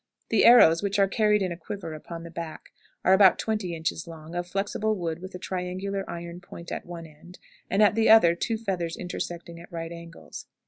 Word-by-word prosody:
The 225 - +3
arrows, 165 -9 +7
which 200 0 -1
are 195 -1 +4
carried 210 0 +2
in 185 - -2
a - - -3
quiver 180 -1 -7
upon 165 +2 -8
the 170 - -9
back, 165 -1 -7 0.4
are 190 - +6
about 190 -2 +6
twenty 210 -6 -2
inches 160 +1 -3
long, 160 0 -10
of 175 0 -3
flexible 205 +3 -1
wood, 170 -4 -3
with 185 0 -8
a - - -4
triangular 185 +2 -4
iron 170 0 -7
point 170 -1 -11
at - - -5
one 170 -1 -8
end, 160 +4 -15 0.3
and 200 +2 +3
at 210 - +5
the 225 +1 +2
other 220 -7 +7
two 220 +6 -2
feathers 185 -6 -3
intersecting 170 -1 -6
at 170 - -14
right 165 -1 -5
angles. 170 0 -10
175 Hz, 210 wpm, -26 LUFS, 170-200 Hz, 0.4 s, arrows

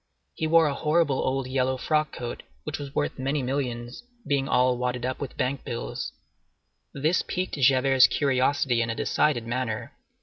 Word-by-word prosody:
He 160 - -2
wore 165 0 +5
a 145 - +1
horrible 150 -1 +1
old 135 0 0
yellow 130 0 0
frock 155 +2 0
coat, 120 -1 -6 0.2
which - - -4
was 140 -1 -8
worth - - -1
many 135 +1 -1
millions, 125 -2 -3 0.2
being 140 -1 0
all 125 0 +3
wadded 125 0 -2
with 140 - -6
bank 130 +1 -1
bills. 120 - -4 0.8
This 155 +5 +1
piqued 185 +1 -3
Javert's 135 0 +5
curiosity 130 -3 +1
in 115 - -1
a 115 - -2
decided 130 -4 +1
manner. 115 -2 -3
130 Hz, 160 wpm, -26 LUFS, 125-145 Hz, 0.8 s, wore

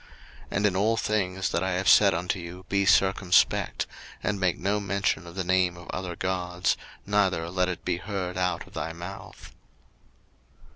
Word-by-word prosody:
02:023:013 - - -22 0.5
And 105 - +1
in 100 -3 +2
all 110 +4 +2
things 95 -3 0
that 85 - 0
I 95 - 0
have 95 +2 -1
said 100 -4 +7
unto 90 +3 -2
you 90 +2 -9
be 100 0 +1
circumspect: 95 -2 +3 0.4
and 100 -1 -1
make 90 -2 +1
no 100 +3 0
mention 100 -4 -1
of 85 - -10
the 95 - -1
name 90 -1 +2
of 85 - -12
other 90 -2 -4
gods, 90 0 -1 0.3
neither 95 -5 +1
let 90 0 +1
it 90 - -5
be 90 -1 0
heard 95 -1 -4
out 90 -2 -1
of - - -18
thy 80 0 -4
mouth. 90 +4 -9
95 Hz, 180 wpm, -27 LUFS, 90-100 Hz, 0.5 s, said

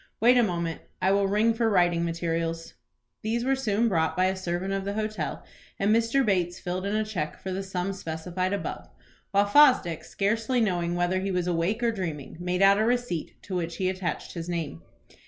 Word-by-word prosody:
Wait 240 +3 +6
a 245 - +6
moment. 170 -6 -1 0.2
I 190 - +2
will 200 0 +3
ring 215 +3 +3
for 225 0 +1
writing 175 -4 +3
materials." 165 -1 -2 0.5
These 235 +3 -1
were 270 +1 +3
soon 230 -3 +1
brought 165 -6 +1
by 185 - +4
a 190 +1 +1
servant 185 +1 -2
of 195 0 -1
the 200 +1 -3
hotel 215 0 -3 0.3
and 205 +2 +3
Mr. 230 +4 +2
Bates 180 -4 0
filled 185 +2 -3
in 205 - -1
a 215 0 +1
cheque 175 -8 -4
for 190 - -5
the 190 +1 -2
sum 190 0 -3
specified 180 +1 -3
above, 200 - -4 0.4
while 200 +1 +3
Fosdick, 205 - +5
scarcely 225 +5 0
knowing 175 -6 0
whether 175 +1 +1
he 195 +1 -2
was 180 -2 0
awake 180 +7 0
or 235 - +3
dreaming, 170 -9 -5
made 180 +2 0
out 200 +1 +6
a - - +3
receipt 240 -8 -1
to 190 - -5
which 170 -1 -2
he 185 -1 +1
attached 185 -1 -4
his 170 0 -5
name. 160 - -3
190 Hz, 200 wpm, -27 LUFS, 175-215 Hz, 0.5 s, Wait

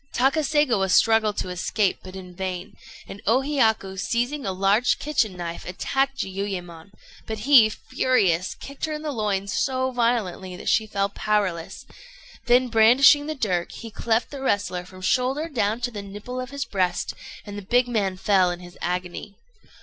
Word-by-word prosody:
Takaségawa 270 -6 +2
struggled 220 +1 +3
to - - -2
escape, 185 +2 0
but 185 0 -11
in 180 -1 -9
vain; 190 +2 -5 0.3
and 200 - -9
O 240 +5 +4
Hiyaku, 220 -9 +1
seizing 245 +5 -1
a - - 0
large 195 +6 +2
kitchen 230 -10 -1
knife, 170 -1 -5
attacked 270 +9 -1
Jiuyémon; 190 -4 -5 0.4
but 220 - -4
he, 245 -3 +7
furious, 195 -7 0
kicked 280 +2 -6
her 310 - -4
in 300 0 -5
the 305 - -2
loins 200 -5 -2
so 260 -1 0
violently 225 -7 -1
that - - -4
she 220 -1 +2
fell 200 -1 -1
powerless, 200 -5 -2 0.6
then 250 +1 +4
brandishing 250 +6 +6
the 310 - -3
dirk, 185 - -1
he 230 - -9
cleft 225 +2 0
the 280 -2 -7
wrestler 200 -7 -1
from 185 0 -13
the - - -4
shoulder 265 - +1
down 225 -7 -1
to 245 0 -2
the 210 -3 -6
nipple 205 +6 -7
of 255 - -7
his 280 0 -4
breast, 185 -3 -1 0.3
and 205 -1 -8
the 205 - -5
big 245 +5 +2
man 200 -6 -1
fell 190 -2 +3
in 175 0 -4
his 175 0 -13
agony. 180 +3 -4
215 Hz, 175 wpm, -24 LUFS, 190-255 Hz, 0.6 s, he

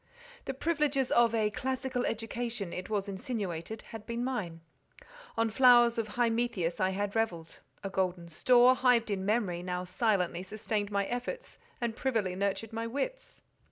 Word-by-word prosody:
The 270 - -3
privileges 285 -3 0
of 235 -1 +4
a 215 -1 +2
"classical 260 +2 -2
education," 225 -3 -3
it 180 +2 -5
was 205 -2 -1
insinuated, 200 -1 -4
had 225 -1 -8
been 235 +1 -2
mine; 195 -11 -3 0.8
on 225 -1 +2
flowers 240 -1 +6
of 215 -2 -4
Hymettus 230 -7 0
I 185 - +2
had 200 +2 -2
revelled; 175 -8 -2 0.2
a 195 - -3
golden 180 -2 -1
store, 245 +9 +5
hived 250 -4 +3
in 190 -2 -1
memory, 205 -6 +1
now 180 0 -3
silently 180 -3 0
sustained 205 +1 -2
my 200 -1 0
efforts, 250 - -5 0.2
and 235 -2 -2
privily 225 -9 0
nurtured 200 +3 -2
my 230 0 -2
wits. - - -4
225 Hz, 155 wpm, -31 LUFS, 190-245 Hz, 0.8 s, flowers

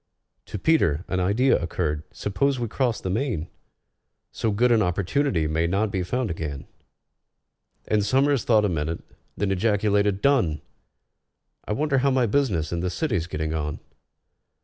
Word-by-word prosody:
To - - -5
PETER 95 - +2
an 95 - -1
idea 100 +8 +2
occurred. 80 -3 -2
"Suppose 135 +6 -1
we 120 - -1
cross 120 +1 0
the 95 - -3
main? 105 - -2 0.8
So 115 - -1
good 120 +4 +2
an 115 -2 +4
opportunity 95 - 0
may 80 +2 0
not 100 +4 0
be 95 - -1
found 120 +4 -1
again." 75 -4 -5 1.2
And 105 -1 +2
SOMERS 135 +5 +2
thought 110 -3 +3
a - - +1
minute, 80 -1 -2 0.4
then 100 -1 0
ejaculated, 105 0 +1
"Done! 115 - +2 1.0
I - - -2
wonder 140 +3 +1
how 140 +2 +2
my 130 -2 +2
business 100 - 0
in 85 - -1
the 90 +1 -1
City's 90 - -1
getting 80 -1 -3
on?" 75 -1 -3
100 Hz, 150 wpm, -24 LUFS, 85-125 Hz, 1.2 s, an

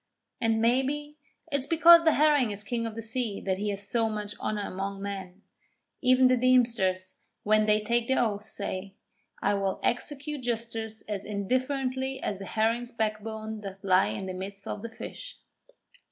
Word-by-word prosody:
And, 225 -1 +2
maybe, 270 +6 0 0.3
it's 280 -1 -1
because 335 0 +8
the 320 - +6
Herring 295 -5 +4
is 205 0 -5
King 230 +1 -2
of 220 - -7
the 225 - -5
Sea 230 -2 -3
that 190 -1 -1
he 210 +1 -1
has 200 0 -3
so 225 0 +1
much 210 -1 -4
honour 210 -1 -2
among 195 +1 -4
men. 195 -1 -6 0.6
Even 255 0 +5
the 255 - +4
deemsters, 230 -7 +2 0.3
when 215 0 +3
they 210 0 +4
take 235 +2 +1
their 265 - +2
oath, 210 -4 +1
say: 195 -2 -5 0.5
'I - - +3
will 195 -1 -1
execute 285 +3 -2
justice 225 -2 -3
as 205 -2 -4
indifferently 260 +5 -1
as 200 - -3
the 195 - -6
herring's 230 +4 0
backbone 220 -1 -3
doth 195 -1 -8
lie 185 -1 +4
in 195 - -4
the 185 - -4
midst 195 +2 -7
of 205 - -4
the 230 - -5
fish.' - - -9
220 Hz, 170 wpm, -28 LUFS, 200-255 Hz, 0.6 s, because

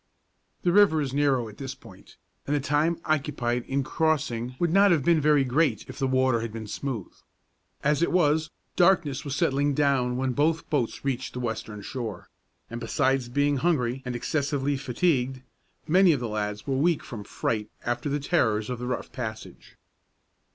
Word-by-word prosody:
The 175 - +3
river 195 -4 +5
is 140 -3 -2
narrow 135 -4 +2
at 105 - -12
this 135 -1 -6
point, - - -16 0.3
and 145 - +1
the - - +2
time 150 +4 +1
occupied 135 -6 -1
in 135 +1 -1
crossing 130 -6 -1
would 170 +2 0
not 200 +1 +6
have 160 -7 +2
been 170 -2 +4
very 150 -1 +4
great 145 +5 +1
if - - -9
the 135 - +1
water 130 -2 +2
had 115 -1 -4
been 110 0 -6
smooth. 115 -2 -5 0.7
As 150 +2 +2
it 170 - +2
was, 160 -3 +2 0.3
darkness 170 -7 +3
was 140 -2 -3
settling 140 +1 +1
down 130 -4 +2
when 130 0 0
both 155 +5 +1
boats 140 -3 -1
reached 130 -1 -2
the 125 - -5
western 110 -3 -4
shore; 110 -5 -6 0.4
and 115 +1 -7
besides 130 +3 0
being 145 +2 +1
hungry 130 -5 0
and 125 -2 -4
excessively 140 +2 -1
fatigued, 130 -1 0 0.4
many 180 +1 +5
of 140 - -1
the 120 - -3
lads 105 -1 -3
were 135 - -1
weak 160 +3 +2
from 110 -4 -7
fright 105 +1 -2 0.2
after 120 +4 -1
the 145 +1 0
terrors 125 -8 +1
of 125 - -4
the 125 - -4
rough 125 -1 -3
passage. 110 -4 -7
135 Hz, 180 wpm, -26 LUFS, 120-150 Hz, 0.7 s, not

